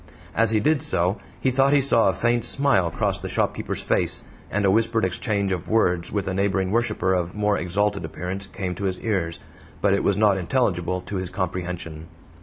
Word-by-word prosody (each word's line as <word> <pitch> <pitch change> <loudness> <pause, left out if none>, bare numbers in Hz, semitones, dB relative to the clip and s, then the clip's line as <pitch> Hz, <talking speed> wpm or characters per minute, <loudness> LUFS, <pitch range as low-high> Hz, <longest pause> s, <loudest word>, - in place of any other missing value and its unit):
As 115 0 +3
he 110 -1 +2
did 150 +6 +2
so 95 - 0 0.2
he 130 - +1
thought 135 +2 +3
he 145 - +5
saw 115 -6 +4
a 95 - -1
faint 120 +3 +1
smile 120 -8 +3
cross - - -1
the - - -6
shopkeeper's - - -1
face, - - +1 0.3
and 105 +1 0
a 95 - +4
whispered 115 0 +2
exchange 100 +1 -1
of 90 -3 -3
words 90 -6 +1
with 100 -2 -2
a 95 - -1
neighboring 95 -1 0
worshiper 105 -4 +1
of 90 0 -2
more 105 0 +1
exalted 100 +2 0
appearance 90 +5 -5
came 95 -2 -4
to 100 +3 -5
his 95 -1 -2
ears. 90 -7 -1 0.4
But - - +2
it 100 - +1
was 100 - +2
not 105 -2 +3
intelligible 90 -4 0
to 100 - -5
his 95 -1 -3
comprehension. 90 -4 -4
100 Hz, 200 wpm, -23 LUFS, 90-110 Hz, 0.4 s, he